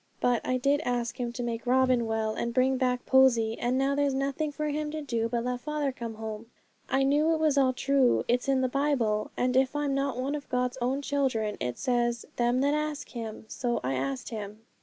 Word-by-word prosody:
But 245 -2 +2
I 255 - 0
did 280 +4 +2
ask 240 -2 -2
Him 240 -1 -2
to 245 - -4
make 235 0 -4
Robin 255 -2 +3
well, 220 -1 -1
and 235 +2 -3
bring 260 +1 +3
back 250 -1 0
Posy; 235 -4 +4
and 245 +2 0
now 270 +1 +2
there's 280 -1 +1
nothing 275 +3 -1
for 305 +1 -3
Him 300 +1 -2
to 310 0 -5
do 230 -4 -1
but 235 0 -1
let 250 0 -2
father 300 0 -2
come 235 -3 -6
home. 220 0 -6 0.4
I 270 +1 +2
knew 300 +4 +3
it - - -3
was 310 -2 +2
all 270 -2 +4
true; 270 0 +2
it's 245 +3 +1
in 265 -1 +3
the 260 - +2
Bible, 250 -6 0
and 250 0 +1
if 265 +2 +2
I'm 290 -1 0
not 275 -2 -1
one 265 +3 -2
of 295 -1 -5
God's 250 +1 -1
own 265 +4 0
children, 255 -7 0
it 125 -1 -3
says, 240 -1 0
"Them 240 +1 +2
that 285 +1 +2
ask 300 -1 -2
Him." 225 -3 -7
So 240 +1 -2
I 130 +1 -1
asked 135 0 -3
Him.' 215 -1 -7
255 Hz, 225 wpm, -28 LUFS, 235-275 Hz, 0.4 s, Posy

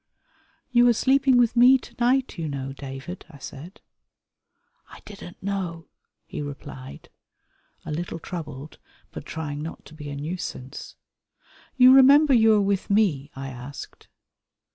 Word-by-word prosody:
"You 245 0 +5
are 240 - +5
sleeping 265 +2 +3
with 240 -1 +3
me 250 +2 +7
to - - -15
night, 250 -4 +1
you 160 - -2
know, 135 -2 -5
David," 135 +6 -8
I 155 - -13
said. 155 +9 -10 1.1
"I - - -13
didn't 195 -4 -11
know," 185 -4 -4 0.4
he - - -6
replied, 140 -2 -9 0.8
a - - -5
little 165 +2 -4
troubled 155 -4 -8 0.3
but - - -9
trying 150 -2 -5
not 160 +2 -8
to - - -14
be 150 -2 -8
a 140 - -5
nuisance. 145 -3 -6 0.8
"You 255 0 +8
remember 275 +2 +7
you 225 -2 +5
are 210 - +3
with 195 -1 -1
me?" 185 -10 +2
I 135 0 -6
asked. 130 +2 -10
170 Hz, 140 wpm, -24 LUFS, 145-235 Hz, 1.1 s, You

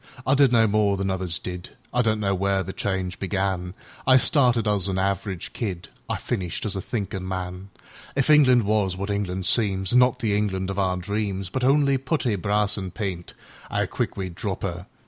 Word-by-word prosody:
I 135 - +3
did 140 -2 +5
no 115 -2 +5
more 105 -2 +2
than 95 0 -1
others 95 -2 -2
did,I 90 +6 -4
don't 110 -2 +1
know 100 -2 +1
where 95 0 +1
the 95 - -6
change 95 -2 -3
began;I 95 +5 0
started 125 -4 +3
as 100 -2 +2
a 95 0 -1
average 95 -1 -2
kid,I 95 -7 -5
finished 95 -6 -3
as 105 - -1
a 95 - -2
thinkin' 100 -4 -4
man. 95 +1 -5 0.5
If 135 -1 +1
England 130 -5 +6
was 100 -3 +1
what 100 +2 -3
England 95 -2 -2
seemsAn' 95 +1 +2
not 125 -1 +5
the 105 -3 0
England 95 -2 -1
of 95 - -3
our 95 -1 +1
dreams, 100 0 -2
But 130 - -2
only 140 0 +3
putty, 130 -4 0
brass, 105 +2 0
an' 95 -1 -4
paint,'Ow 90 -3 -5
quick - - -3
we'd 95 -3 -4
drop 95 +1 -4
'er! 90 0 -4
100 Hz, 180 wpm, -24 LUFS, 95-110 Hz, 0.5 s, England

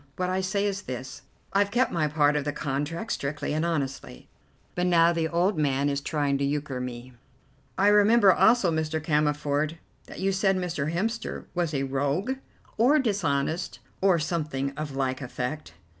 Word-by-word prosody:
What 185 0 -1
I 190 +1 0
say 200 +2 0
is 200 0 -1
this: 130 -4 -7 0.3
I've 200 0 +3
kept 245 +5 +1
my 155 -3 +1
part 150 0 +2
of 150 - 0
the 145 - -1
contract 150 +7 -3
strictly 145 +1 -2
and 155 +1 0
honestly, 140 -6 -3 0.5
but 180 0 0
now 170 -1 +5
the 165 -1 0
old 175 +2 +1
man 140 -1 +1
is 140 0 -1
trying 145 -2 0
to - - 0
euchre 140 -2 -2
me." 125 0 -7 0.6
"I 200 - +3
remember 210 -1 +6
also, 220 -6 +4
Mr. 160 0 -1
Cammerford, 150 0 0 0.3
that - - -10
you 195 +1 +1
said 195 0 +2
Mr. 165 -5 -2
Hemster 220 +7 -3
was 175 -3 -1
a 135 - 0
rogue 145 - -1 0.4
or 260 +7 +5
dishonest, 175 - -1 0.2
or 190 -2 +4
something 150 -4 -2
of 150 -2 -5
like 130 0 -1
effect." 125 - -5
155 Hz, 170 wpm, -26 LUFS, 140-185 Hz, 0.6 s, remember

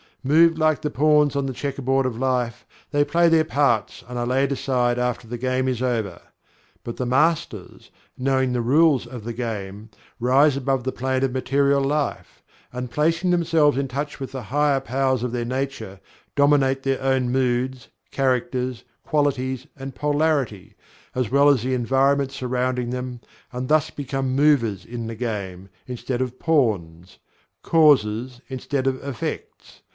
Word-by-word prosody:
Moved 160 +4 +4
like 155 -1 +2
the 150 - -1
pawns 150 +1 +3
on 140 -1 0
the 130 - -3
checkerboard 135 0 -1
of 125 -3 -2
life, 125 -3 -1 0.3
they 145 -1 +3
play 170 +3 +3
their 165 -1 +4
parts 135 -8 0
and 125 0 -5
are 120 - -1
laid 135 +3 +1
aside 125 -3 0
after 125 -1 -2
the 120 +2 -5
game 130 +1 -1
is 125 -2 -1
over. 110 -8 -2 0.6
But 120 - -6
the 125 - -2
Masters, 150 - 0 0.3
knowing 130 -1 +1
the 120 - 0
rules 140 +2 +3
of 120 -2 -8
the 120 +1 -5
game, 110 -3 -5 0.3
rise 135 +4 +4
above 135 -1 -1
the 130 - -2
plane 130 +1 -1
of 135 - +1
material 140 +2 +1
life, 145 +1 -2 0.3
and 125 0 -5
placing 165 +5 +1
themselves 165 -5 +3
in 140 - -1
touch 145 +4 -4
with 135 - -6
the 130 -2 -6
higher 145 +1 +2
powers 130 -1 0
of 125 - -2
their 120 -1 -2
nature, 125 -6 -4 0.4
dominate 140 -2 +3
their 135 -1 -1
own 130 -2 +1
moods, 130 -1 -1 0.2
characters, 125 -2 -1 0.2
qualities, 130 -4 -1
and 135 0 -8
polarity, 145 - -1 0.4
as 125 -4 -1
well 140 +1 +5
as 135 -6 +3
the 130 +1 -1
environment 135 +2 +2
surrounding 125 -2 -2
them 125 -1 -5 0.3
and 125 0 -4
thus 155 0 +3
become 135 -2 -3
Movers 130 -10 +2
in 115 -1 -6
the 115 - -5
game, 100 -5 -5 0.2
instead 125 0 -4
of 130 0 -3
Pawns 95 - 0 0.5
Causes 125 -6 +3
instead 130 +1 -3
of 130 -1 -1
Effects. 140 -5 -6
130 Hz, 160 wpm, -23 LUFS, 120-140 Hz, 0.6 s, well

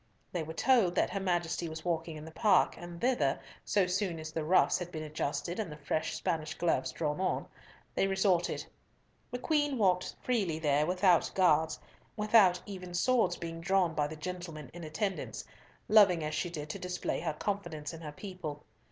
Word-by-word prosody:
They 175 - -2
were 160 +1 -6
told 230 -8 +3
that - - +2
her 195 - -2
Majesty 175 -2 -1
was 160 +1 -7
walking 165 -2 -2
in 150 - -9
the 160 - -9
Park, 195 +2 +3
and 175 -1 -9
thither, 235 - +1 0.2
so 200 -3 +2
soon 180 -1 -1
as 155 0 -6
the 160 -1 -2
ruffs 180 +4 +4
had 175 -1 -6
been 155 -2 -5
adjusted 155 +4 -3
and 200 -7 -3
the 150 - -8
fresh 155 +2 -2
Spanish 155 -2 -2
gloves 165 -6 +1
drawn 150 +2 -2
on, 190 - 0 0.5
they 195 - +2
resorted. 190 -3 +1 0.6
The 245 - -3
Queen 290 0 +1
walked 185 -4 +2
freely 200 -11 0
there 150 -1 +2
without 180 -1 +4
guards—without 185 +3 +3
even 185 -3 -7
swords 225 -3 +2
being 165 0 -6
worn 190 -4 +3
by 150 -1 +1
the 155 - -7
gentlemen 165 -4 -6
in 175 0 -8
attendance—loving 190 +2 +1
as 155 0 -2
she 175 +4 -1
did 150 -3 -6
to - - -6
display 180 0 -2
her 160 -1 -2
confidence 170 -4 -3
in 165 - -9
her 150 -2 -6
people. 160 -4 -7
175 Hz, 180 wpm, -31 LUFS, 155-190 Hz, 0.6 s, ruffs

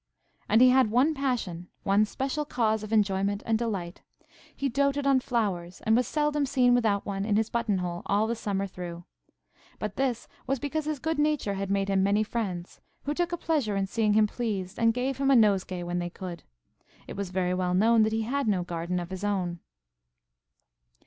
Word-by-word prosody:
And 220 +3 +5
he 255 0 +8
had 260 -3 +4
one 255 +8 +3
passion–one 210 - -1
special 270 +7 -2
cause 220 -7 0
of 215 0 -7
enjoyment 200 -1 +1
and 225 - +1
delight. 195 -7 -3 0.5
He 275 - -1
doated 280 +2 +1
on 275 -1 +4
flowers, 195 -9 -2
and 220 - +4
was 250 +1 +2
seldom 295 -1 0
seen 250 -2 +3
without 220 -5 +2
one 195 -1 -3
in 205 0 +1
his 220 +1 +1
button 230 -4 0
hole 175 -1 -3
all 210 +2 +2
the 230 - -1
summer 200 -3 -2
through. 175 -2 -7 0.7
But 210 -1 -5
this 250 -3 -1 0.2
was 270 - +1
because 290 +3 -3
his 305 -1 -2
good 320 +2 -2
nature 295 -9 +1
had 195 0 -3
made 195 0 +1
him 195 -1 +2
many 200 +2 +3
friends, 195 -6 -4 0.2
who 290 - -1
took 345 +2 -1
a 345 - -1
pleasure 290 -12 0
in 195 0 +1
seeing 210 +1 +1
him 215 0 +5
pleased, 205 -4 -3
and 230 -1 +4
gave 255 +3 -2
him 275 0 +2
a 275 - +6
nosegay 195 -5 +2
when 175 0 -2
they 175 0 -3
could. 175 -1 -7 0.6
It - - -8
was 200 -2 -4
very 180 -1 0
well 180 -1 0
known 225 +4 +4
that 215 0 +3
he 220 0 0
had 275 +3 -1
no 190 -4 +1
garden 175 +1 -3
of 175 +1 -6
his 190 +1 -6
own. 185 -4 -1
215 Hz, 200 wpm, -27 LUFS, 190-255 Hz, 0.7 s, he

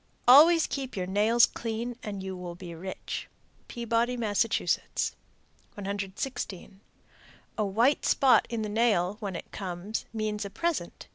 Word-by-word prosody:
Always 320 +6 +8
keep 265 -5 -5
your 185 - -1
nails 215 +5 +4
clean 235 +1 -4
and 200 -2 -5
you 190 0 -5
will 180 -1 -7
be 175 -1 -9
rich. 185 +3 -6 0.4
Peabody, 235 +1 -1
Mass. 210 -4 +2
116. 200 -2 -4 0.7
A 215 - 0
white 235 +9 +2
spot 270 -2 +4
in 230 -2 -2
the - - -2
nail, 210 -3 +1
when 200 -4 -4
it - - -8
comes, 190 +2 -4
means 215 -1 -2
a 200 - -5
present. 320 - -3
215 Hz, 135 wpm, -28 LUFS, 190-235 Hz, 0.7 s, Always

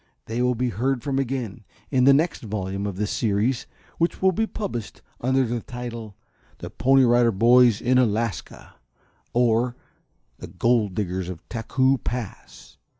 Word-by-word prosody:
They 115 +2 -3
will 125 0 +2
be 125 +1 -1
heard 120 +4 -1
from 135 -1 -1
again, 125 -5 -3 0.3
in 130 -2 +3
the 140 - +8
next 155 +5 +2
volume 100 -2 -4
of 100 - -4
this 105 +2 -2
series, 115 +3 0 0.3
which 170 +1 0
will 190 0 +4
be 220 +4 -1
published 155 - -6 0.2
under 130 +2 +2
the 120 +1 -2
title, 115 -3 -7 0.4
"THE - - -8
PONY 135 +1 +4
RIDER 120 -1 +4
BOYS 120 +1 +5
IN 125 +1 +3
ALASKA; 115 -5 -2 0.6
Or, 120 0 +2 0.6
The - - -8
Gold 115 -6 +1
Diggers 95 -3 -2
of 90 -3 -9
Taku 130 +3 +1
Pass." 115 -2 -7
120 Hz, 150 wpm, -24 LUFS, 110-130 Hz, 0.6 s, the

